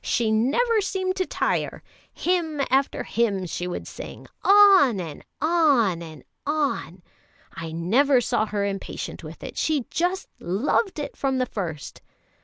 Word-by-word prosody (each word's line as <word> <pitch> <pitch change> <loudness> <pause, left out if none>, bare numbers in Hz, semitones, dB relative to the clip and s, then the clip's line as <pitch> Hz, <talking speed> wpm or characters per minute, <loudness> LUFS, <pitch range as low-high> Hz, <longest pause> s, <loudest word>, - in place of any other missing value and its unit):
"She 225 -2 +1
never 360 - +2
seemed 375 -1 -1
to 370 - 0
tire; - - -1 0.3
hymn 335 -4 -1
after 270 +1 +1
hymn 205 -5 0
she 175 +1 -4
would 180 - -5
sing, - - -9 0.2
on 390 - +7
and 165 -4 -7 0.2
on 280 - +3
and 155 -5 -10 0.2
on. 280 - -2 0.5
I 165 -1 -6
never 240 - +3
saw 220 -2 0
her 205 -1 -1
impatient 195 -1 -5
with - - -10
it; - - -6
she 300 -6 0
just 360 +3 -1
loved 255 - 0
it 290 - -5
from 270 -1 0
the 255 - +1
first." 170 - -6
260 Hz, 145 wpm, -24 LUFS, -, 0.5 s, on